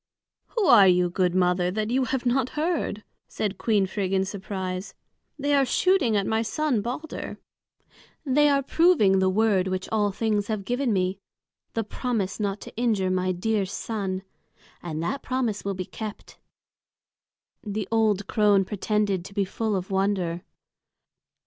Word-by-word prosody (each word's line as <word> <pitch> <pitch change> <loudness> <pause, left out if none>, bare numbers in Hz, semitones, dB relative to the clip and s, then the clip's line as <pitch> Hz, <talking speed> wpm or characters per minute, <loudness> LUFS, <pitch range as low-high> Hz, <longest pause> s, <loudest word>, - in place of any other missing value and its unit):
"Who 435 - +3
are 210 - +8
you, 180 -1 +3
good 180 -1 +1
mother, 180 -1 +2
that 215 +4 -2
you 260 +1 +2
have 265 0 -2
not 250 +1 +1
heard?" 305 -10 -1 0.2
said 205 -2 -3
Queen 210 -4 +2
Frigg 190 0 -2
in 190 0 +2
surprise. 190 -1 -5 0.4
"They 285 0 0
are 280 -1 +5
shooting 270 - +2
at 200 - 0
my 220 +2 +1
son 255 0 0
Balder. 255 +8 -5 0.9
They 295 +2 +4
are 280 -1 +2
proving 270 - +4
the 190 0 +3
word 195 -2 +2
which 185 0 -3
all 210 -2 +2
things 210 0 0
have 215 -3 -3
given 245 +2 0
me, 185 -1 0 0.6
the 225 - 0
promise 215 -3 -3
not 200 -1 -1
to - - -10
injure 215 -6 +1
my 185 0 +1
dear 205 +3 0
son. 195 -2 -3 0.6
And 160 -2 -4
that 270 +11 -2
promise 245 -5 -2
will 200 -1 -2
be 185 0 -4
kept." 215 +2 -8 1.2
The 205 -2 -3
old 215 -3 +2
crone 205 -3 +3
pretended 205 -2 -1
to 200 - -11
be 200 -2 +1
full 215 +2 -2
of 190 0 -4
wonder. 190 -3 0
205 Hz, 155 wpm, -25 LUFS, 190-235 Hz, 1.2 s, are